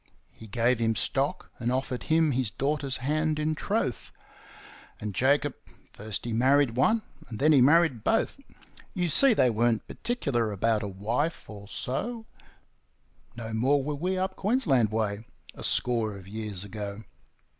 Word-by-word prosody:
He 110 - -13
gave 120 +3 +1
him 115 -1 +1
stock, 145 - -1
and 120 0 -1
offered 130 -1 -2
him 160 -1 +4
his 130 -3 0
daughter's 140 +3 -2
hand 155 +1 +1
in 155 +1 0
troth; 155 - -2 0.9
And 105 -1 -4
Jacob 140 +5 +2 0.4
first 105 +1 -5
he 120 - -2
married 135 +3 +4
one, 215 - +2 0.2
and 110 - -7
then 155 +6 +4
he 140 -4 +6
married 145 -4 +4
both; 225 - +1 0.6
You 175 -2 0
see, 265 - +5
they 125 - +4
weren't 115 0 +1
particular 135 - -1
about 110 +2 +1
a 105 - -3
wife 115 - -2
or 100 -2 -10
so 225 - -3 1.1
No 110 -1 -5
more 135 +5 +2
were 150 +2 -2
we 180 +6 -2
up 190 +1 -1
Queensland 170 - +2
way 110 -1 -1 0.3
a - - -11
score 115 -4 0
of 95 -1 -13
years 105 -2 -5
ago. 105 +1 -6
125 Hz, 155 wpm, -28 LUFS, 110-155 Hz, 1.1 s, he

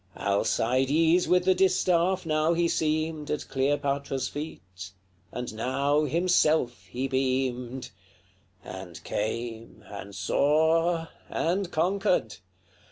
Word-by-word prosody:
Alcides 130 - +2
with 180 0 +3
the 190 - +5
distaff 185 -1 +2
now 155 +1 +2
he 170 0 +2
seemed 155 -1 -1
At 150 - -3
Cleopatra's 140 -1 -1
feet, 95 - -8 0.4
and 125 -2 -5
now 140 +6 +1
himself 155 - +2
he 125 +8 -3
beamed. 130 -1 -1 0.7
XCI. 95 - -7
And 85 -4 -11
came, 115 +2 -4
and 100 -1 -9
saw, 160 - +2 0.2
and 180 +2 -1
conquered. 180 - 0
145 Hz, 100 wpm, -27 LUFS, 120-165 Hz, 0.7 s, the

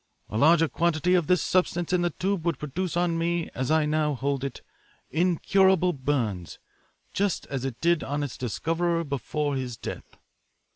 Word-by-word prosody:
A 105 - -2
larger 165 +3 +5
quantity 170 +2 +1
of 175 -4 +3
this 180 -1 +3
substance 180 -1 +1
in 180 - +3
the 175 - +2
tube 190 +1 -2
would 170 -4 0
produce 170 +5 -3
on 170 -1 +1
me, 170 0 -1
as 130 +1 -2
I 155 -1 +3
now 150 -1 +1
hold 135 +1 -2
it, 140 -2 -5 0.5
incurable 180 +2 +3
burns, 125 - -2 0.6
just 200 -2 0
as 135 -2 -2
it 125 -3 -4
did 170 -1 +2
on 145 +1 -2
its 140 - -5
discoverer 165 +8 -1
before 145 0 -2
his 125 -3 -4
death. - - -8
160 Hz, 165 wpm, -26 LUFS, 140-175 Hz, 0.6 s, larger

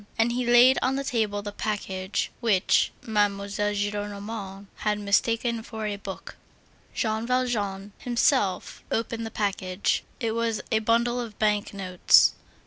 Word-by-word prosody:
And 230 +1 +3
he 245 0 -1
laid 245 +2 +6
on 260 +1 +1
the 275 - -2
table 215 -5 -1
the 205 - -5
package 195 -2 -3
which 215 -6 +2
Mademoiselle 205 -1 0
Gillenormand 205 -1 -4
had 210 0 0
mistaken 230 +3 +1
for 220 -1 -6
a 210 -1 -2
book. 200 -1 -8 0.6
Jean 220 +1 -1
Valjean 210 -6 -1
himself 235 -6 0
opened 230 0 -2
the - - -6
package; 200 -3 -1 0.2
it 230 -4 -1
was 230 -1 -1
a 220 - +3
bundle 235 +2 +1
of 225 -3 -8
bank 210 -1 +1
notes. 185 -3 +4
215 Hz, 135 wpm, -26 LUFS, 200-230 Hz, 0.6 s, laid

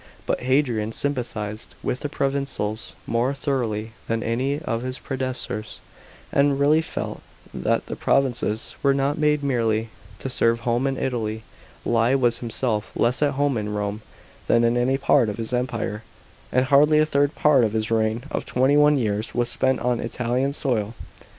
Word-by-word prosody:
But - - 0
Hadrian 125 -5 +1
sympathised 115 -7 -3
with 125 - -1
the 145 - -4
provincials 135 -7 -2
more 120 +4 0
thoroughly 115 -5 -1 0.2
than 115 0 -1
any 130 +5 0
of 115 -7 -3
his 130 +1 -4
predecessors, 130 -5 -4 0.5
and 140 0 +3
really 150 +3 +4
felt 160 - -5 0.3
that - - 0
the - - -5
provinces 120 -4 0
were 140 -1 +3
not 140 +3 0
made 150 -1 +2
merely 115 -4 +1 0.3
to - - -5
serve 115 -2 +1
Home 120 +3 +1
and 135 -1 -1
Italy, 110 -3 -2 0.4
lie 115 +2 +3
was 120 -3 +2
himself 115 -2 -2
less 120 +4 +1
at 145 -1 +3
home 140 -3 +1
in 105 - -3
Eome 105 0 -2 0.5
than 115 0 +4
in 115 +1 +3
any 125 +2 +2
part 135 -4 +3
of 105 - -5
his 115 +1 -4
Empire, 115 -4 -2 0.5
and 130 +1 +3
hardly 150 +2 +5
a 155 - +5
third 145 -1 +1
part 145 -4 +4
of 110 -2 +1
his 110 0 -1
reign 110 +1 +1
of - - -2
twenty 130 +3 +2
one 150 0 +5
years 105 -3 -1
was 120 -1 +1
spent 130 0 +1
on 125 -1 +1
Italian 125 +3 -1
soil. 115 -6 -1
125 Hz, 170 wpm, -24 LUFS, 115-140 Hz, 0.5 s, hardly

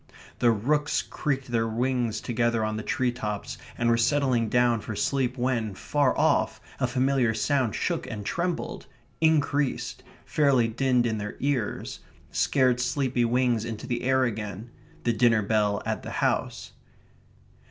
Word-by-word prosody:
The 120 - +4
rooks 145 +7 +1
creaked 135 -4 -3
their 115 -1 +1
wings 120 -1 -1
together 115 -2 0
on 110 0 -2
the 110 - -3
tree 125 +3 0
tops, 105 -4 -5 0.2
and 120 - 0
were 115 0 +4
settling 125 -2 +2
down 120 -1 +3
for 110 0 -6
sleep 130 +4 0
when, 120 -5 -1
far 145 +5 +1
off, - - +2 0.2
a 125 - +1
familiar 130 -2 +1
sound 130 -1 +1
shook - - -2
and 105 -2 -6
trembled 175 - -3 0.3
increased 150 -3 +1 0.2
fairly 135 -6 +3
dinned 125 +1 +1
in 110 -2 -1
their 105 +1 -5
ears 135 -6 -2 0.3
scared 130 -3 +2
sleepy 125 -1 0
wings 120 -1 +1
into 115 -2 -5
the 120 -1 -2
air 130 +1 +2
again 110 -1 -4 0.3
the 120 - +2
dinner 110 -1 +3
bell 105 -1 +1
at - - -2
the - - -7
house. - - -1
120 Hz, 150 wpm, -26 LUFS, 110-130 Hz, 0.3 s, The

